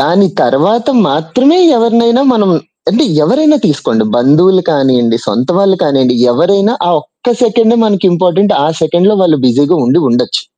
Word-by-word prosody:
దాని 190 +4 +1 0.2
తరువాత 180 - 0 0.2
మాత్రమే 255 - 0 0.2
ఎవరినైనా 235 +2 +1
మనం 205 -4 0 0.4
అంటే 225 - 0 0.2
ఎవరైనా 300 - +1
తీసుకోండి 140 -7 -2
బంధువులు 165 +10 +2
కానియ్యండి, 130 -6 0
సొంత 125 +2 -2
వాళ్ళు 195 -1 +1
కానియ్యండి, 130 -3 0 0.2
ఎవరైనా 195 - 0
ఆ - - 0
ఒక్క 240 +9 -5
సెకండే 230 0 +1
మనకి 200 -4 -2
ఇంపార్టెంట్. 185 +4 0
ఆ - - -1
సెకండ్‍లో 175 +6 +1
వాళ్ళు 170 -4 +2
బిజీగా 140 +7 +1
ఉండి 125 +7 +1
ఉండొచ్చు. 120 0 -2
180 Hz, 140 wpm, -10 LUFS, 140-220 Hz, 0.4 s, బంధువులు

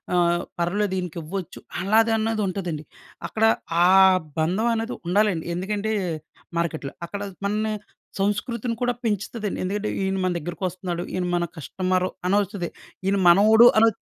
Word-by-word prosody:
ఆహ్, 175 0 +2 0.2
పర్లేదు 190 +3 0
ఈయనకివ్వచ్చు 175 +1 -5 0.2
అలాగన్నది 220 +2 +2
ఉంటదండి. 175 -5 -3 0.4
అక్కడ 220 0 +1 0.4
ఆ - - +6 0.5
బంధం 185 +9 +1
అన్నది 225 +2 -2
ఉండాలండి. 190 -2 +2
ఎందుకంటే 205 +4 -2 0.7
మార్కెట్‌లో, 160 -4 -2 0.2
అక్కడ 200 +3 -6 0.2
మనని 215 +2 0 0.5
సంస్కృతిని 230 +4 -1
కూడా 245 0 +2
పెంచుతాదండి. 210 0 -2
ఎందుకంటే 205 +3 -2
ఈయన 190 0 0
మన 185 - +1
దగ్గరికి 170 +3 -6
వస్తున్నాడు 180 -1 -4
ఈయన 185 -1 -1
మన 175 - +1
కస్టమరు 185 +3 -1 0.2
అనొస్తది. 200 -2 0 0.4
ఈన 195 - +3
మనవోడు 215 +6 +7
అనోచ్ 225 -1 +5
195 Hz, 125 wpm, -24 LUFS, 175-215 Hz, 0.7 s, మనవోడు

